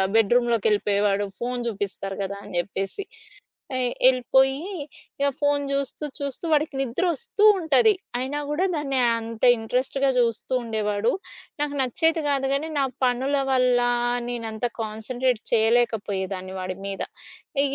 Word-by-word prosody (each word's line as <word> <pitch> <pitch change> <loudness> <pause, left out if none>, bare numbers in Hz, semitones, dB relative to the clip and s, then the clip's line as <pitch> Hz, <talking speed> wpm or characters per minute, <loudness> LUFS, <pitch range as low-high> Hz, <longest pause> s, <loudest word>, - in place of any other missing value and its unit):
బెడ్‌రూమ్‌లోకెళ్ళిపోయేవాడు 210 -3 +2
phone 245 +1 -2
చూపిస్తారు 200 -2 -4
కదా 200 0 -3
అని - - -11
చెప్పేసి. 195 - -3 0.8
ఎ - - 0 0.3
ఎళ్ళిపోయి 265 +2 +3 0.6
ఇక 280 - +3
ఫోను 290 -1 +2
చూస్తూ, 275 +2 -2
చూస్తూ 280 +2 -5
వాడికి 305 -1 +2
నిద్రొస్తూ 335 - -1
ఉంటది, 330 - +4 0.2
అయినా 265 +3 -2
కూడా 335 +6 +1
దాన్ని 275 -3 0 0.2
అంత 225 0 -8 0.2
ఇంట్రెస్ట్‌గా 255 +4 0
చూస్తూ 230 +1 -1
ఉండేవాడు. 215 -1 0 0.5
నాకు 290 -1 -2
నచ్చేది 320 +6 +1
కాదు 270 -1 +1
కానీ, 305 +3 -2
నా 275 - +3 0.2
పనుల 255 +3 +1 0.2
వల్ల 250 -1 +4 0.5
నేనంత 230 -1 -4 0.2
కాన్సంట్రేట్ 225 +2 -2
చేయలేకపోయేదాన్ని 205 -5 +1
వాడి 185 0 -4
మీద. 195 -1 -3 0.6
ఇగ 275 - -2
245 Hz, 120 wpm, -24 LUFS, 215-275 Hz, 0.8 s, ఉంటది